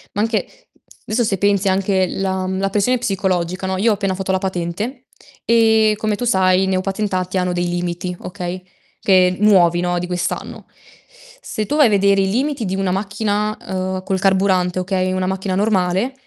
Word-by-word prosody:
Ma 205 Hz, -, 0 dB
anche 225 Hz, 0 st, -3 dB, 0.4 s
adesso, 235 Hz, +2 st, 0 dB
se 195 Hz, -2 st, 0 dB
pensi, 200 Hz, 0 st, +1 dB
anche 190 Hz, 0 st, +1 dB
la 190 Hz, 0 st, -2 dB
mhmm, 190 Hz, 0 st, -2 dB
la 195 Hz, 0 st, 0 dB
pressione 210 Hz, +6 st, +1 dB
psicologica, 190 Hz, -4 st, -1 dB
no, 190 Hz, 0 st, -1 dB
io 220 Hz, +4 st, +3 dB
ho -, -, +4 dB
appena 195 Hz, -2 st, -2 dB
fatto 190 Hz, 0 st, -3 dB
la 190 Hz, -, +2 dB
patente 190 Hz, +6 st, -4 dB, 0.4 s
e, 220 Hz, -2 st, +4 dB
come 215 Hz, 0 st, -1 dB
tu 225 Hz, -, -5 dB
sai, 190 Hz, -4 st, +3 dB
i -, -, +1 dB
neopatentati 190 Hz, 0 st, -1 dB
hanno 180 Hz, 0 st, 0 dB
dei 175 Hz, 0 st, -1 dB
limiti, 175 Hz, +1 st, -3 dB
okay, 180 Hz, -1 st, -6 dB, 0.4 s
che 185 Hz, -2 st, +4 dB
nuovi, 180 Hz, -5 st, +4 dB
no, 175 Hz, 0 st, 0 dB
di 180 Hz, -, -4 dB
quest'anno. 180 Hz, -1 st, -4 dB, 0.8 s
Se 215 Hz, -, -4 dB
tu 290 Hz, -, -2 dB
vai 295 Hz, -4 st, +6 dB
a -, -, +1 dB
vedere 200 Hz, -1 st, +3 dB
i 190 Hz, -, +1 dB
limiti 270 Hz, +4 st, -1 dB
di 190 Hz, 0 st, -2 dB
una 195 Hz, -1 st, 0 dB
macchina, 210 Hz, +2 st, -1 dB
uhm, 185 Hz, 0 st, -3 dB
col 190 Hz, 0 st, -1 dB
carburante, 190 Hz, -2 st, +2 dB
okay, 185 Hz, 0 st, -1 dB
una 185 Hz, 0 st, -1 dB
macchina 190 Hz, 0 st, -2 dB
normale, 195 Hz, +3 st, +1 dB
190 Hz, 185 wpm, -19 LUFS, 185-205 Hz, 0.8 s, vai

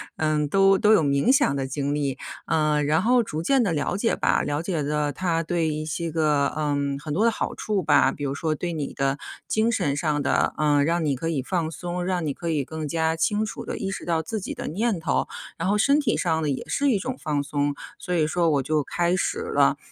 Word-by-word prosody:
嗯， 155 Hz, -1 st, 0 dB
都 195 Hz, +3 st, +4 dB
都 215 Hz, +1 st, +4 dB
有 160 Hz, -, +4 dB
冥 140 Hz, -, +2 dB
想 270 Hz, -, +4 dB
的 135 Hz, -1 st, -2 dB
经 140 Hz, +1 st, -2 dB
历。 140 Hz, -3 st, -1 dB, 0.3 s
呃， 150 Hz, -1 st, +2 dB
然 155 Hz, +4 st, +2 dB
后 245 Hz, +3 st, +4 dB
逐 160 Hz, -6 st, -4 dB
渐 270 Hz, +3 st, +3 dB
地 190 Hz, -7 st, +1 dB
了 150 Hz, +5 st, -1 dB
解 230 Hz, +2 st, +1 dB
吧， -, -, +2 dB
了 145 Hz, +2 st, -1 dB
解 170 Hz, -3 st, -2 dB
了 150 Hz, 0 st, 0 dB
它 165 Hz, +1 st, -1 dB
对 165 Hz, 0 st, 0 dB
一 155 Hz, 0 st, -2 dB
些 165 Hz, +2 st, -3 dB
个 150 Hz, -3 st, +2 dB
嗯， 145 Hz, -2 st, -1 dB
很 150 Hz, -1 st, -5 dB
多 210 Hz, +7 st, +2 dB
的 230 Hz, -, +4 dB
好 -, -, -3 dB
处 205 Hz, -4 st, -2 dB
吧。 -, -, +4 dB
比 145 Hz, -, -7 dB
如 135 Hz, -1 st, -1 dB
说 155 Hz, +2 st, -1 dB
对 175 Hz, +3 st, -3 dB
你 150 Hz, -4 st, -4 dB
的 135 Hz, +1 st, 0 dB, 0.3 s
精 220 Hz, +2 st, +2 dB
神 150 Hz, -11 st, 0 dB
上 150 Hz, -1 st, 0 dB
的， 140 Hz, -, +1 dB
呃， 145 Hz, -2 st, +3 dB
让 170 Hz, 0 st, +1 dB
你 140 Hz, -3 st, 0 dB
可 165 Hz, -, -3 dB
以 150 Hz, -5 st, 0 dB
放 165 Hz, 0 st, -1 dB
松， 175 Hz, +3 st, -4 dB
让 180 Hz, -3 st, -1 dB
你 145 Hz, -, -1 dB
可 170 Hz, +3 st, -5 dB
以 150 Hz, -4 st, 0 dB
更 160 Hz, -1 st, -5 dB
加 160 Hz, +1 st, 0 dB
清 210 Hz, +6 st, +1 dB
楚 -, -, -7 dB
地 -, -, -4 dB
意 195 Hz, -4 st, -3 dB
识 195 Hz, -, -5 dB
到 165 Hz, -2 st, +1 dB
自 215 Hz, +7 st, -4 dB
己 -, -, -4 dB
的 -, -, -6 dB
念 205 Hz, +2 st, 0 dB
头。 160 Hz, -3 st, 0 dB, 0.3 s
然 175 Hz, +3 st, -1 dB
后 210 Hz, -, +2 dB
身 280 Hz, +7 st, +4 dB
体 255 Hz, -6 st, +1 dB
上 160 Hz, -3 st, 0 dB
的 150 Hz, -, 0 dB
也 135 Hz, -, -3 dB
是 285 Hz, 0 st, +1 dB
一 210 Hz, -, +2 dB
种 255 Hz, +6 st, -4 dB
放 145 Hz, -2 st, 0 dB
松， 145 Hz, 0 st, -1 dB, 0.2 s
所 180 Hz, -, -4 dB
以 155 Hz, -2 st, +3 dB
说 170 Hz, 0 st, +1 dB
我 140 Hz, -3 st, +1 dB
就 150 Hz, +1 st, 0 dB
开 175 Hz, +4 st, 0 dB
始 295 Hz, -, -1 dB
了。 455 Hz, -1 st, +2 dB
160 Hz, 260 characters per minute, -24 LUFS, 145-185 Hz, 0.3 s, 都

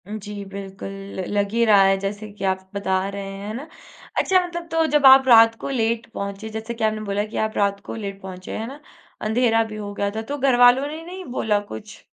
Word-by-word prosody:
उ, -, -, -10 dB
जी, 210 Hz, -, -7 dB, 0.2 s
बिल्कुल 195 Hz, -1 st, -7 dB, 0.3 s
ल 190 Hz, -, -2 dB
लग 200 Hz, -1 st, 0 dB
ही 235 Hz, 0 st, +3 dB
रहा 205 Hz, -3 st, +6 dB
है 195 Hz, 0 st, +3 dB
जैसे 205 Hz, +2 st, -4 dB
कि -, -, -7 dB
आप 190 Hz, 0 st, -6 dB
बता 200 Hz, -1 st, -1 dB, 0.2 s
रहे 200 Hz, 0 st, -5 dB
हैं, 195 Hz, +1 st, -7 dB
है 215 Hz, -, -4 dB
ना? 270 Hz, +7 st, -6 dB, 0.5 s
अच्छा 375 Hz, -1 st, +4 dB
मतलब 345 Hz, -1 st, -6 dB
तो 325 Hz, 0 st, +2 dB
जब 290 Hz, -2 st, +4 dB
आप 265 Hz, 0 st, +8 dB
रात 225 Hz, -2 st, +7 dB
को -, -, -3 dB
लेट 230 Hz, -2 st, 0 dB
पहुँचे, 200 Hz, +1 st, -5 dB
जैसे 220 Hz, +2 st, -5 dB
कि 230 Hz, -1 st, -5 dB
आपने 215 Hz, 0 st, +1 dB
बोला 205 Hz, +1 st, 0 dB
कि -, -, -3 dB
आप 220 Hz, -, -5 dB
रात 200 Hz, -1 st, +1 dB
को -, -, -4 dB
लेट 195 Hz, 0 st, -6 dB
पहुँचे, 185 Hz, -1 st, -7 dB
है 225 Hz, -, -4 dB
ना? 275 Hz, +4 st, -9 dB, 0.4 s
अँधेरा 225 Hz, +1 st, +2 dB
भी 215 Hz, -, -7 dB
हो 205 Hz, -1 st, -6 dB
गया 200 Hz, 0 st, -1 dB
था, 220 Hz, -, -2 dB
तो 280 Hz, +6 st, -5 dB
घरवालों 255 Hz, 0 st, +5 dB
ने 310 Hz, +2 st, -7 dB
नहीं 365 Hz, +1 st, -8 dB
बोला 210 Hz, -2 st, +2 dB
कुछ? 110 Hz, -, -10 dB
220 Hz, 235 wpm, -22 LUFS, 200-245 Hz, 0.5 s, आप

